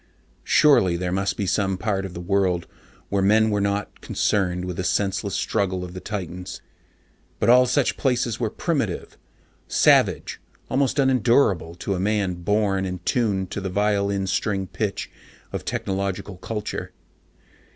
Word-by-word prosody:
Surely 100 - +4
there 90 0 -2
must 95 +1 -1
be 100 - -1
some 95 0 0
part 95 0 -1
of 90 - -12
the - - -5
world 90 -1 +1 0.4
where 100 0 +1
men 110 +3 +4
were 105 -1 +1
not 100 +1 -2
concerned 90 -3 0
with 90 -1 -5
the 95 - -2
senseless 100 +2 0
struggle 95 -4 -1
of 90 -1 -7
the 90 - -6
titans. 90 -3 -6 0.8
But - - +2
all 125 +1 +6
such 125 +2 +1
places 125 -4 0
were 115 -3 0
primitive, 135 - -2 0.5
savage, - - +3 0.3
almost 135 +1 +1
unendurable 120 - +3
to 95 +3 -3
a 90 - -2
man 100 -1 +1
born 100 0 +1
and 90 -1 -5
tuned 100 -6 0
to 100 - -3
the 95 - -3
violin 100 0 +1
string 95 0 -1
pitch 100 +1 -3 0.4
of - - -5
technological 95 0 -3
culture. 105 +2 -5
100 Hz, 150 wpm, -23 LUFS, 95-105 Hz, 0.8 s, all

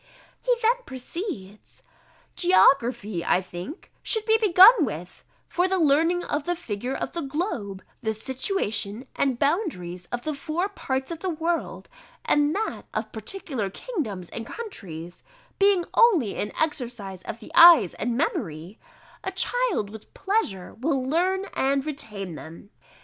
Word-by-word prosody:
He - - +2
then 470 +3 +4
proceeds: 255 - -7 0.5
"Geography, 240 - +3
I - - +3
think, 185 - -8
should 440 -2 0
be 445 0 +4
begun 395 0 +8
with: 180 - -5 0.2
for 360 +1 +1
the 380 0 +1
learning 330 +3 +3
of 290 0 -2
the 350 - 0
figure 250 - -4
of - - -3
the 340 - -4
globe, 270 - -3 0.2
the 220 -3 0
situation 235 - -2
and 265 -3 +1
boundaries 210 - -1
of 245 0 -3
the 310 - -2
four 315 +7 -2
parts 265 -7 -3
of 330 - -5
the 375 - -2
world, 335 +1 -2 0.4
and 295 +1 +3
that 440 +2 -3
of - - -2
particular 270 - -4
kingdoms 210 - -5
and 230 0 -6
countries, 175 - -8 0.4
being 395 -3 +4
only 360 - +4
an 205 - -3
exercise 240 - -3
of 220 - -7
the 220 - -12
eyes 340 -1 +8
and 240 -1 -2
memory, 180 - -3 0.4
a 380 - -2
child 385 - 0
with 220 -1 -12
pleasure 385 - -1
will 265 -1 0
learn 370 +6 +1
and 275 +1 +1
retain 210 - -5
them. 165 +6 -11
275 Hz, 145 wpm, -25 LUFS, -, 0.5 s, begun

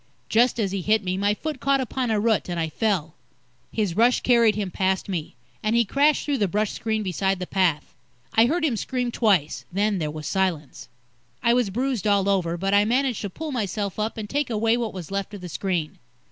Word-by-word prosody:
Just 240 +2 +3
as 200 -4 0
he 195 -1 -2
hit 215 +3 +2
me, 185 0 -1
my 205 +2 +1
foot 305 +4 -5
caught 275 0 +2
upon 255 -1 -2
a 215 -1 +2
root, 220 -3 +1
and 175 -1 -2
I 160 -1 -1
fell. 175 -5 -1 0.6
His 205 -6 -1
rush 235 +4 +4
carried 235 -4 +4
him 200 -3 -3
past 190 0 0
me, 175 -9 -4 0.3
and 215 +2 0
he 235 0 +4
crashed 285 +7 +2
through 285 -3 0
the 205 - +2
brush 210 +3 0
screen 220 -1 -2
beside 190 +1 0
the 180 - -4
path. 175 -6 0 0.4
I 225 +1 +5
heard 325 +4 +1
him 265 -7 +1
scream 250 +1 -2
twice, 195 -11 +1
then 200 +1 +1
there 155 -2 -2
was 155 0 -7
silence. 175 -7 -2 0.6
I 235 - +4
was 245 -4 +2
bruised 245 0 -1
all 200 -1 +3
over, 175 -4 +1
but 195 +3 -1
I 205 0 +5
managed 250 +2 0
to 205 - -3
pull 310 - -6
myself 205 -4 -3
up 215 +2 -2
and 215 -1 -4
take 290 +4 -1
away 225 0 +2
what 235 -3 -2
was 185 -2 -8
left 200 +1 -3
of 200 - -9
the 180 - -6
screen. 170 -2 -2
210 Hz, 220 wpm, -24 LUFS, 190-235 Hz, 0.6 s, I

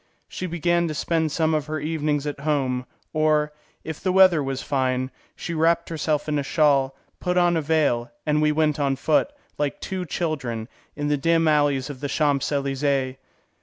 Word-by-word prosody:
She 185 - -5
began 175 0 +1
to 155 - -4
spend 160 +1 0
some 160 +1 +1
of 150 -1 -1
her 155 0 -3
evenings 150 -1 -1
at 145 -1 -4
home, 135 -4 -1 0.3
or, 155 -1 +2 0.3
if 160 -1 -6
the 185 - +1
weather 185 -4 +6
was 135 -1 -3
fine, 130 -1 0 0.2
she 170 - -5
wrapped 165 +1 +2
herself 155 -2 -1
in 150 -1 0
a - - -1
shawl, 140 -2 +2 0.2
put 180 0 -1
on 175 -1 +4
a 165 - +1
veil, 145 -6 +1 0.2
and 150 0 +2
we 150 0 +3
went 150 -1 +1
on 140 -1 +1
foot, 155 - +1 0.3
like 145 -1 -1
two 185 -2 -4
children, 135 -10 -3 0.3
in 145 0 -2
the 145 - +2
dim 165 +3 +2
alleys 145 -2 +2
of 135 - -10
the 145 +1 -4
Champs 145 -2 +1
Elysées. 140 -2 0
150 Hz, 185 wpm, -24 LUFS, 140-160 Hz, 0.3 s, weather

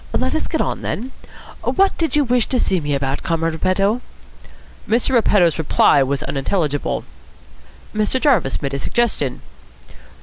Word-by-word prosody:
Let - - -1
us - - -1
get - - -1
on, - - -2
then. 250 +5 -4 0.5
What 390 0 +2
did 325 -3 -1
you 295 - +4
wish 245 -2 +1
to 255 - 0
see 185 - +1
me 145 -1 -1
about, 135 0 -2
Comrade 165 0 -1
Repetto?" 195 +8 +1 0.9
Mr. 230 +4 +2
Repetto's 200 - +3
reply 145 -2 +4
was 135 +1 0
unintelligible. 145 0 -1 0.9
Mr. 215 +4 0
Jarvis 225 - +1
made 140 0 -2
a 140 - -2
suggestion. 200 - -1
185 Hz, 145 wpm, -19 LUFS, 145-240 Hz, 0.9 s, you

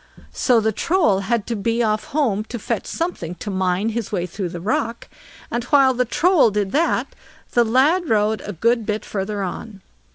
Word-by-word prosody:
So 245 -3 +3
the 220 0 +1
Troll 320 - +2
had 215 +2 -1
to 235 - -3
be 230 +3 0
off 215 -1 0
home 240 -9 0
to 240 - -6
fetch 215 - -3
something 330 - -3
to 205 - -6
mine 185 +2 0
his 225 -1 -4
way 180 -4 -1
through 180 +1 -4
the 175 0 -6
rock; 225 +5 -2 0.4
and 240 0 -1
while 270 0 +4
the 250 0 0
Troll 325 +1 +3
did 205 -2 -1
that, 320 +7 0 0.4
the 240 - +4
lad 285 +10 +2
rode 215 0 +2
a 205 - -5
good 230 +6 +1
bit 215 0 -2
further 200 0 -3
on. 195 +2 -6
220 Hz, 190 wpm, -21 LUFS, 200-245 Hz, 0.4 s, while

